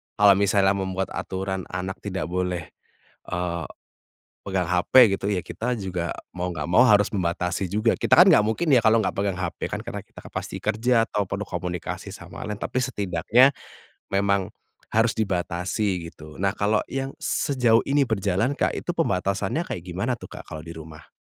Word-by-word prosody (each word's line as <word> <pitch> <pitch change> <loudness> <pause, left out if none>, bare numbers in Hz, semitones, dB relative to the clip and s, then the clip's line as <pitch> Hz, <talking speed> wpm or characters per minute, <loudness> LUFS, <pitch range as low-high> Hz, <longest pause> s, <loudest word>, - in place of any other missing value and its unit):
kalau 100 -1 +7
misalnya 100 -1 +3
membuat 95 -1 -2
aturan 95 0 -4
anak 90 +1 -5
tidak 95 -5 -4
boleh, 90 -3 -2 0.6
eee, 85 -2 -2 0.8
pegang 95 -3 -1
HP 90 -1 -1 0.2
gitu, - - -6
ya 95 - 0
kita 125 +2 -2
juga 90 -4 -3 0.2
mau 90 0 -2
nggak - - -4
mau 90 - +5
harus 105 -2 +5
membatasi 90 0 -1
juga. 110 +2 +2
Kita - - +1
kan 180 - +10
nggak 130 - +6
mungkin 110 +10 -1
ya, 120 - +6
kalau 110 0 +5
nggak 100 - -1
pegang 100 -2 -1
HP 85 -2 -4
kan, - - -2
karena - - -5
kita - - -15
kan - - -11
pasti - - -4
kerja 115 +2 +2
ataupun 100 0 -2
komunikasi 90 -1 -4
sama - - -9
lain. 105 -1 -4
Tapi - - -4
setidaknya, 110 - +3 0.6
memang 100 -1 +1 0.4
harus 115 +1 +3
dibatasi 90 -2 -1
gitu. 75 0 -13
Nah, 95 0 +2
kalo 105 +1 +2
yang 135 0 -3
sejauh 120 -5 +2
ini 140 0 +2
berjalan, 105 +6 0
Kak. - - +1
Itu 175 - -3
pembatasannya 100 - 0
kayak 85 - -5
gimana 95 +8 -2
tuh, - - -9
Kak? - - -9
Kalo 80 - -6
di 85 - -8
rumah. 80 -1 -11
95 Hz, 170 wpm, -24 LUFS, 90-110 Hz, 0.8 s, kan